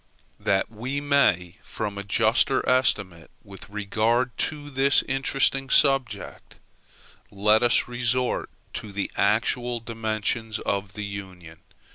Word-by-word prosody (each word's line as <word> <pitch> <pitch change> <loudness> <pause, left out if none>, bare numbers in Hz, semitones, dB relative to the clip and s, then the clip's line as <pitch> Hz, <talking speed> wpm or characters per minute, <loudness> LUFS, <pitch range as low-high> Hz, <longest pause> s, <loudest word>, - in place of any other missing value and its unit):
That 100 +2 0
we 125 +6 -4
may 105 - +2
form 100 -2 -5
a - - -5
juster 110 +6 +2
estimate 100 - +1
with 100 0 -12
regard 110 +4 0
to 145 -1 -9
this 135 +1 +3
interesting 135 0 0
subject, 135 -8 +1 0.7
let 105 +2 +3
us 120 -1 +3
resort 120 +1 -1 0.3
to 105 - -10
the 100 0 -3
actual 120 +4 +1
dimensions 110 0 -3
of 100 -2 -3
the 105 -1 -5
Union. 95 -5 -9
110 Hz, 115 wpm, -25 LUFS, 100-130 Hz, 0.7 s, this